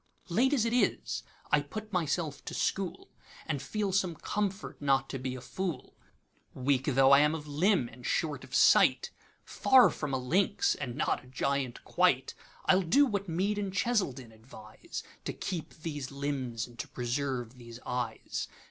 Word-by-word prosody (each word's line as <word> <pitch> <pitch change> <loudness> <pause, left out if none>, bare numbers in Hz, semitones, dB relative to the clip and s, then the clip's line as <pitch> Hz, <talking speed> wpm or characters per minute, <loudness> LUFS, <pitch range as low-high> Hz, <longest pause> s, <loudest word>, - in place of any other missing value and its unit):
Late 245 +10 +3
as 255 -6 +2
it 230 - 0
is, 245 - +1 0.3
I 150 - +5
put 215 +9 -8
myself 160 -3 -1
to - - -5
school, 195 -3 -2 0.3
And 145 -4 -2
feel 210 -2 -2
some 185 -3 +1
comfort 200 +2 -3
not 135 -1 +2
to 135 - -4
be 130 0 -3
a 130 - -8
fool. 185 +5 -5 0.6
Weak 130 0 +1
tho' 135 -1 +4
I 140 - +9
am 150 +2 +3
of 150 -2 -6
limb, 155 - +2
and 120 +1 -14
short 150 +3 -1
of - - -7
sight, - - +5 0.3
Far 260 -2 +5
from 150 -2 -4
a 135 - +1
lynx, 175 +11 +2
and 125 -4 -5
not - - 0
a - - -17
giant 135 -1 -2
quite,I - - +1
'll - - +2
do 195 - +4
what 200 -6 -2
Mead 195 +5 0
and 200 -2 -2
Cheselden 185 - -1
advise, 110 -1 -10 0.2
To - - -2
keep 175 -5 -5
these 150 -4 -5
limbs, 135 -5 -3
and 120 -1 -17
to - - -4
preserve 125 -1 -3
these 115 0 -10
eyes. 120 -3 -3
145 Hz, 170 wpm, -30 LUFS, 130-190 Hz, 0.6 s, I